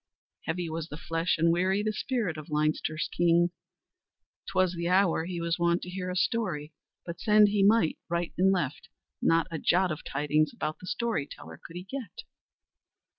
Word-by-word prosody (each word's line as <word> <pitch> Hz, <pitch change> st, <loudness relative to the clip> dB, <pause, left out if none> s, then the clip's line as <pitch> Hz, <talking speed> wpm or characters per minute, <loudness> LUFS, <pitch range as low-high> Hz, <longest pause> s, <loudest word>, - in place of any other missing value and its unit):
Heavy 170 Hz, +1 st, -2 dB
was 160 Hz, 0 st, -4 dB
the 150 Hz, -, -8 dB
flesh 165 Hz, +2 st, -1 dB
and 165 Hz, +1 st, +3 dB
weary 190 Hz, +4 st, +1 dB
the 215 Hz, 0 st, 0 dB
spirit 215 Hz, -5 st, -1 dB
of 155 Hz, +2 st, -9 dB
Leinster's 155 Hz, +1 st, 0 dB
king. 175 Hz, 0 st, +3 dB, 1.0 s
'Twas 185 Hz, -1 st, +2 dB
the 170 Hz, -1 st, -3 dB
hour 180 Hz, -3 st, +3 dB
he 175 Hz, -1 st, -4 dB
was 170 Hz, +1 st, -1 dB
wont 170 Hz, 0 st, +2 dB
to 180 Hz, -, -7 dB
hear 185 Hz, 0 st, -4 dB
a 180 Hz, -, -3 dB
story, 185 Hz, -7 st, -1 dB, 0.3 s
but 170 Hz, -1 st, -6 dB
send 210 Hz, -1 st, +5 dB
he 205 Hz, -1 st, +1 dB
might 200 Hz, -4 st, +4 dB
right 170 Hz, 0 st, -1 dB
and 190 Hz, +2 st, +4 dB
left, 150 Hz, -7 st, -2 dB, 0.3 s
not 165 Hz, 0 st, +3 dB
a 160 Hz, -, -3 dB
jot 180 Hz, +3 st, +2 dB
of 155 Hz, -, -5 dB
tidings 150 Hz, +2 st, +1 dB
about 155 Hz, -10 st, -4 dB
the 180 Hz, -, -11 dB
story 215 Hz, -9 st, -1 dB
teller -, -, -11 dB
could 165 Hz, -, -11 dB
he 180 Hz, -, -5 dB
get. 225 Hz, -2 st, -7 dB
175 Hz, 180 wpm, -28 LUFS, 160-190 Hz, 1.0 s, send